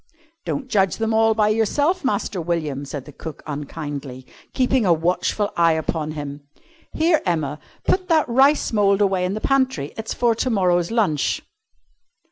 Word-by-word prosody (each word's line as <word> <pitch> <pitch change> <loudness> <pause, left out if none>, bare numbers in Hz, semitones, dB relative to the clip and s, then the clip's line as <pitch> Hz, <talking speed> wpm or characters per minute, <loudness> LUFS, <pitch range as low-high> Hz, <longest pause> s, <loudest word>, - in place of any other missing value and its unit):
"Don't 275 -2 -3
judge 195 -7 +1
them 225 0 -1
all 225 0 +3
by 215 -1 +3
yourself, 285 - +1
Master 205 -6 -1
William," 155 -5 -2
said 140 -1 -6
cook 160 -2 -8
unkindly, 145 -3 -6 0.3
keeping 255 -1 +2
a 185 - +3
watchful 180 +5 0
eye 170 -1 +4
upon 160 -1 -2
him. 145 -1 -6 0.5
"Here, 320 0 +2
Emma, 155 -5 -1 0.2
put 370 -1 +1
that 320 -2 +3
rice 265 +3 +3
mould 200 -2 +3
away 190 -3 +2
in 185 +2 -2
the - - -3
pantry. 260 - 0
It's 220 0 -4
for 240 -1 +2
to 230 +3 -1
morrow's 180 -5 +2
lunch." 200 - 0
195 Hz, 155 wpm, -22 LUFS, 155-235 Hz, 0.5 s, eye